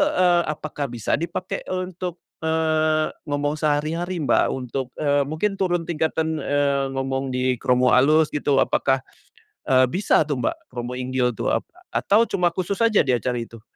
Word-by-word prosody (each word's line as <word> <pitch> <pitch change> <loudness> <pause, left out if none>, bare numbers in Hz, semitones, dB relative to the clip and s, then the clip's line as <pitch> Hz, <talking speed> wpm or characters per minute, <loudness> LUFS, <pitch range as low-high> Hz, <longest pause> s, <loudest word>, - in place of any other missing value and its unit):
eee, 175 -1 +4
apakah 150 -1 -4
bisa 120 +3 -1
dipakai 170 +2 -3
untuk, 185 -1 -4 0.2
eee, 155 -1 +1 0.2
ngomong 145 +1 -1
sehari-hari, 160 +3 -1
Mbak? - - +3
Untuk, 130 0 -4
eee, 145 -2 +1
mungkin 195 +6 -2
turun 175 -3 +1
tingkatan, 160 -1 -1
eee, 140 -1 +1
ngomong 135 -1 -2
di 125 -1 0
kromo 125 0 +3
alus 150 +5 +4
gitu 145 -2 +2
apakah, 135 -1 0 0.7
eee, 130 0 +6
bisa 170 0 +2
tuh 135 -5 -2
Mbak - - -3
kromo 125 0 -6
inggil 125 -1 0
tuh 115 - -1
apa - - -3 0.2
atau 205 - +3
cuma 175 -2 +1
khusus 185 +4 -3
aja 220 -8 +4
di 130 - +3
acara 120 0 -1
itu? 115 -1 -8
145 Hz, 155 wpm, -23 LUFS, 130-165 Hz, 0.7 s, eee